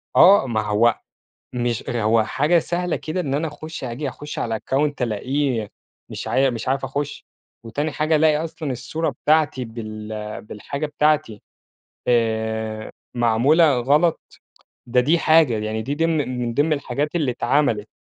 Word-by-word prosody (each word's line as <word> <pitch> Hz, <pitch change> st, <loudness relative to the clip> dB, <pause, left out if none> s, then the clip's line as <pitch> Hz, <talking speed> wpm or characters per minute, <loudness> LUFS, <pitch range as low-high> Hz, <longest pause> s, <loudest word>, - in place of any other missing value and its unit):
آه، 190 Hz, -7 st, +7 dB
ما 110 Hz, -3 st, 0 dB
هو 110 Hz, +2 st, +2 dB, 0.5 s
مش 120 Hz, -2 st, -2 dB
هو 115 Hz, -2 st, +2 dB
حاجة 150 Hz, +9 st, +2 dB
سهلة 175 Hz, +1 st, -1 dB
كده، 160 Hz, +4 st, -3 dB
إن 140 Hz, -5 st, -2 dB
أنا 155 Hz, +2 st, 0 dB
أخُش 155 Hz, 0 st, -8 dB
آجي 130 Hz, +4 st, -4 dB
أخُش 150 Hz, +3 st, -7 dB
على 115 Hz, -1 st, -1 dB
الaccount 145 Hz, +5 st, 0 dB
ألاقيه 125 Hz, 0 st, -1 dB, 0.4 s
مش -, -, -6 dB
ع 135 Hz, 0 st, +3 dB
مش 115 Hz, 0 st, -5 dB
عارف 135 Hz, 0 st, 0 dB
أخُش، 140 Hz, +2 st, -4 dB, 0.4 s
وتاني 145 Hz, +7 st, -3 dB
حاجة 155 Hz, +1 st, +1 dB
ألاقي 155 Hz, 0 st, +3 dB
أصلًا 160 Hz, -3 st, -4 dB
الصورة 135 Hz, +6 st, -2 dB
بتاعتي 150 Hz, -4 st, +2 dB
بال 110 Hz, -2 st, -7 dB
بالحاجة 140 Hz, +8 st, -5 dB
بتاعتي 150 Hz, -7 st, 0 dB, 0.7 s
آآ 110 Hz, -2 st, 0 dB, 0.2 s
معمولة 125 Hz, +5 st, +4 dB
غلَط، 150 Hz, +7 st, +1 dB, 0.5 s
ده 125 Hz, +1 st, +2 dB
دي 160 Hz, +6 st, +2 dB
حاجة، 155 Hz, -8 st, +4 dB
يعني 110 Hz, +1 st, -3 dB
دي 140 Hz, +6 st, -3 dB
ضمن 150 Hz, -6 st, 0 dB
من 120 Hz, -1 st, -2 dB
ضمن 150 Hz, +5 st, +2 dB
الحاجات 145 Hz, +3 st, -2 dB
اللي 145 Hz, -7 st, +1 dB
اتعملِت. 120 Hz, -4 st, +1 dB
135 Hz, 145 wpm, -22 LUFS, 115-150 Hz, 0.7 s, آه